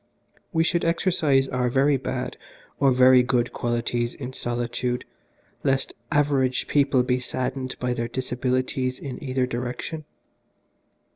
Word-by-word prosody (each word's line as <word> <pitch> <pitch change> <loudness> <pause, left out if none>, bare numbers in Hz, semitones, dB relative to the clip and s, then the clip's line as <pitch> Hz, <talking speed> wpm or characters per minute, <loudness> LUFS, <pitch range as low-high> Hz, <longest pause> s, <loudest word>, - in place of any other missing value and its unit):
We 165 -2 +3
should 170 +1 +1
exercise 165 -5 +2
our 125 -1 0
very 135 +3 +3
bad 130 -1 -3 0.4
or 140 - +5
very 130 0 +7
good 125 -1 0
qualities 120 0 -1
in 130 -1 -6
solitude 120 0 -2 0.6
lest 135 0 +1 0.2
average 140 -3 +2
people 140 -3 +3
be 125 0 +1
saddened 130 +1 -3
by 125 0 -1
their 115 -1 -2
disabilities 130 0 -1
in 135 -1 -7
either 130 -2 0
direction. 125 +6 -4
130 Hz, 125 wpm, -25 LUFS, 125-135 Hz, 0.6 s, very